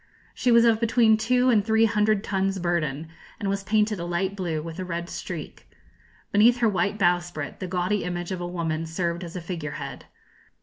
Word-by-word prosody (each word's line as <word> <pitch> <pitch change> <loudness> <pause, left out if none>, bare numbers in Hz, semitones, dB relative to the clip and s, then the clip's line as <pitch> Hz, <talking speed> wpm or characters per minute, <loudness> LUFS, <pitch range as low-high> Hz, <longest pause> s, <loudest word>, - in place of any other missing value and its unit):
She 250 - +1
was 235 0 +6
of 225 -2 +4
between 230 -1 +4
two 250 +3 +2
and 215 -4 +3
three 220 +1 +3
hundred 210 -1 +2
tons 195 -1 -1
burden, 165 -4 -1 0.3
and 205 - -3
was 195 0 -2
painted 210 0 +1
a - - -3
light 175 +3 -1
blue, 175 -5 -2
with 165 +3 -7
a - - -2
red 170 -1 -4
streak. - - -7 0.6
Beneath 230 +4 +5
her 235 -2 +2
white 200 +1 0
bowsprit 175 -5 0
the 185 - -4
gaudy 180 +3 0
image 175 +1 -4
of 185 -1 -3
a 175 - -3
woman 165 -2 -2
served 170 +2 -2
as 170 0 -8
a 180 - -4
figure 165 -4 -5
head. - - -7
185 Hz, 200 wpm, -25 LUFS, 170-215 Hz, 0.6 s, was